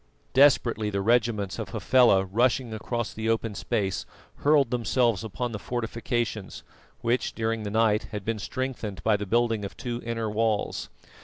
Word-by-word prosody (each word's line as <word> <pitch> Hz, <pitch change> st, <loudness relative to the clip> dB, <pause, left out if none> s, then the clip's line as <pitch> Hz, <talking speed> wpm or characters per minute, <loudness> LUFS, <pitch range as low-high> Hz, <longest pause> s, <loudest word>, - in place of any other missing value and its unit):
Desperately 120 Hz, -6 st, +4 dB
the 100 Hz, -1 st, -1 dB
regiments 110 Hz, -2 st, +1 dB
of -, -, -4 dB
Hafela 120 Hz, -7 st, +4 dB
rushing 120 Hz, +4 st, +1 dB
across 120 Hz, +1 st, -3 dB
the 110 Hz, +1 st, -2 dB
open 115 Hz, -1 st, 0 dB
space, 95 Hz, +1 st, -2 dB, 0.3 s
hurled 145 Hz, -4 st, +3 dB
themselves 120 Hz, -3 st, +1 dB
upon 120 Hz, +3 st, -3 dB
the 105 Hz, -, -5 dB
fortifications, 115 Hz, -3 st, -3 dB, 0.4 s
which, 120 Hz, +2 st, 0 dB
during 115 Hz, 0 st, -1 dB
the 105 Hz, -, -4 dB
night, 110 Hz, 0 st, +2 dB
had 105 Hz, -3 st, -5 dB
been 115 Hz, -1 st, -1 dB
strengthened 115 Hz, -5 st, -4 dB
by 110 Hz, -1 st, +3 dB
the 105 Hz, 0 st, -3 dB
building 115 Hz, 0 st, +1 dB
of 100 Hz, -, -7 dB
two 120 Hz, -1 st, -4 dB
inner 115 Hz, -1 st, -2 dB
walls. 110 Hz, 0 st, -1 dB
115 Hz, 155 wpm, -27 LUFS, 105-120 Hz, 0.4 s, Desperately